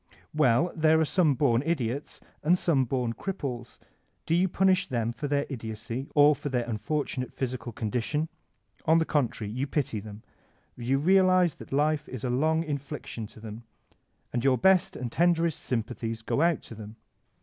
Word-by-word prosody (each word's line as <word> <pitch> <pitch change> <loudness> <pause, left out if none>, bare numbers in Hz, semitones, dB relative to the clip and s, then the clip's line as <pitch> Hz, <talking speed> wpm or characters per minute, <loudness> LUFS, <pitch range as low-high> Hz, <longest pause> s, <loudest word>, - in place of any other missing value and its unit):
Well, 150 +2 +3
there 160 0 +4
are 160 - +3
some 155 -3 +3
bom 120 -3 +2
idiots 140 -4 -2 0.2
and 170 +4 +3
some 145 -7 +2
bom 125 -2 -1
cripples. 125 - -5 0.5
Do - - 0
you 180 +3 +3
punish 185 0 +2
them 115 -4 -1
for 145 +5 -4
their 145 0 +1
idiocy 115 +1 -5
or 145 0 +6
for 145 - -5
their 125 -3 0
unfortunate 125 +3 -2
physical 125 -2 -4
condition? 120 +8 -2 0.6
On 160 +1 +5
the 165 - +2
contrary, 120 -9 -1
you 130 +4 -2
pity 135 -6 -1
them, 105 +1 -10 0.5
you 125 +3 0
realize 185 +1 +4
that - - -13
life 150 +2 +1
is 130 -4 -7
a 125 - -1
long 160 +5 +2
infliction 140 -6 -5
to 110 - -15
Uiem, 110 0 -8 0.7
and 120 0 -1
your 135 -2 +4
best 190 +6 +3
and 125 -2 -5
tenderest 170 -1 +2
sympathies 115 -2 -3
go 140 - 0
out 170 -1 +2
to - - -9
them. 110 0 -10
135 Hz, 170 wpm, -28 LUFS, 120-160 Hz, 0.7 s, or